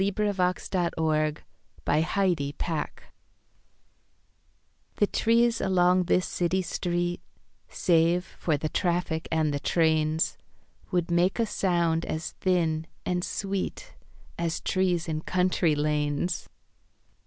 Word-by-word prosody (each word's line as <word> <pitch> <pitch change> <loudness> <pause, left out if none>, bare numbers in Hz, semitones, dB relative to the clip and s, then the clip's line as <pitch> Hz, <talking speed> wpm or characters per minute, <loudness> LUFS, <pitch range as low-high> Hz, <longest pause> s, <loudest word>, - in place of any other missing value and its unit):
Edna 205 +1 0
St. 180 -1 0
Vincent 155 -1 0 0.4
Millay 150 +2 +3
City 175 -8 0
Trees 160 -3 -1 2.1
THE 205 - +4
trees 230 +2 +2
along 180 -1 +3
this 180 +1 +2
city 185 +2 0
street 175 0 -2 0.5
Save 170 +1 +2
for 155 -3 +1
the 155 - -2
traffic 170 -2 -1
and 155 -2 +1
the 145 - -1
trains, 160 0 +1 0.5
Would 175 -1 0
make 175 +2 +2
a 230 - +2
sound 170 -5 +1
as 160 +1 -3
thin 165 -4 +1 0.2
and 180 -1 0
sweet 200 - -3 0.5
As 170 -1 -1
trees 180 -3 0
in 155 -1 -2
country 180 -3 +1
lanes. 150 +3 -1
175 Hz, 110 wpm, -27 LUFS, 160-185 Hz, 2.1 s, THE